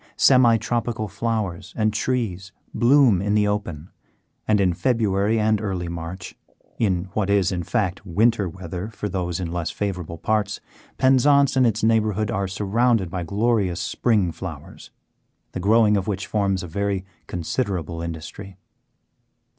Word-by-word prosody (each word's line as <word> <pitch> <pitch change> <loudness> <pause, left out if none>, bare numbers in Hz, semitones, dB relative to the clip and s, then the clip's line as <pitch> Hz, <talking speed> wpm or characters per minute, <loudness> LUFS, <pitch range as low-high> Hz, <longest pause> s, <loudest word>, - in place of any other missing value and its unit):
Semi 125 -4 +5
tropical 115 -1 -2
flowers 100 -3 -3
and 110 -1 +1
trees 105 -6 -2 0.2
bloom 125 -6 +4
in 105 +1 0
the 105 -1 +3
open, 90 -6 -3 0.6
and 105 -1 +3
in 90 -3 +2
February 110 -1 +1
and 110 -1 +2
early 95 -5 -3
March 85 +2 -7 0.4
in 95 -6 +1
what 100 -2 -1
is, 100 -1 +2
in 90 -2 -2
fact, 100 -1 -2
winter 105 +2 +1
weather 90 +2 -6
for 105 -1 -5
those 90 -3 -3
in 85 -3 -4
less 85 -2 -2
favoured 95 -5 -3 0.2
parts 105 -2 0 0.4
Penzance 135 +2 +4
and 130 -2 +4
its 110 -1 -1
neighbourhood 110 -2 +2
are 100 -2 -1
surrounded 105 0 +1
by 90 - -3
glorious 100 0 0
spring 100 -1 +1
flowers, - - -9 0.6
the - - -5
growing 105 +2 +4
of 95 -2 -1
which 100 -1 -2
forms 100 -3 0
a - - -6
very 100 +2 -2 0.2
considerable 90 -2 -3
industry. 85 +4 -7
100 Hz, 145 wpm, -23 LUFS, 90-110 Hz, 0.6 s, Semi